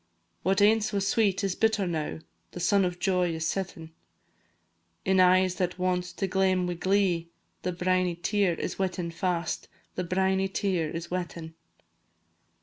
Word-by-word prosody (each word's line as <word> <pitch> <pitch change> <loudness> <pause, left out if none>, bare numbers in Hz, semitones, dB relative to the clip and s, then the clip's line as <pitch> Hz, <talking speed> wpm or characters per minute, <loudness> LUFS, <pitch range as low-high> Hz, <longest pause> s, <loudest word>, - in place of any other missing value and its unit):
What 190 +2 +2
aince 215 +1 +4
was 200 -1 0
sweet 200 -2 +2
is 195 -2 0
bitter 220 -1 +1
now, 160 -2 -3 0.3
The - - -6
sun 195 +2 +3
of 180 -1 -2
joy 180 -3 +1
is 160 0 -2
setting; 170 -4 -4 1.1
In 190 0 +3
eyes 185 0 +5
that 180 -1 -1
wont 180 -1 0
to 195 - 0
glame 190 -1 +2
wi' 180 - -1
glee, 180 -2 +1 0.3
The 180 - -1
briny 180 0 +1
tear 185 +1 +1
is - - -4
wetting 180 -3 -2
fast, 170 -2 -2 0.3
The 180 - -2
briny 190 +2 +1
tear 190 -5 -1
is 165 +2 -6
wetting. 170 -3 -4
185 Hz, 150 wpm, -28 LUFS, 175-195 Hz, 1.1 s, eyes